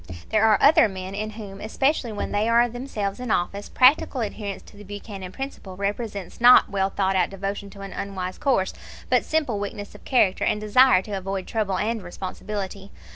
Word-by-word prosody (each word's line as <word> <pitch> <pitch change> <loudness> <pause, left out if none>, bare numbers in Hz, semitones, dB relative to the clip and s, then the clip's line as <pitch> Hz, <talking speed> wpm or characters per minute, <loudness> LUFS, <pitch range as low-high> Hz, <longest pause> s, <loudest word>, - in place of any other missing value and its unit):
There 220 0 +3
are 215 -2 +5
other 280 -6 +6
men 190 0 -7
in 215 +2 -3
whom, 205 -3 -9
especially 265 +2 0
when 210 - -4
they 210 +2 +1
are 235 +1 +5
themselves 235 -4 -4
in 250 -1 -5
office, 200 +2 -1
practical 260 0 +4
adherence 205 -2 -5
to - - -17
the 205 - -12
Buchanan 200 -2 -8
principle 210 -7 -7
represents 200 0 -4
not 245 -2 +7
well 195 -1 +1
thought 195 -1 0
out 180 -2 +2
devotion 200 +1 -5
to 200 0 -12
an 195 0 -7
unwise 185 -2 -5
course, 245 -9 +1 0.4
but - - +4
simple 290 -10 -1
weakness 205 0 -6
of - - -14
character 205 -8 +2
and 210 - +1
desire 215 -1 +5
to 210 - -10
avoid 195 -1 -3
trouble 205 -4 -1
and 225 +1 -1
responsibility. 195 +2 -6
205 Hz, 185 wpm, -24 LUFS, 195-230 Hz, 0.4 s, not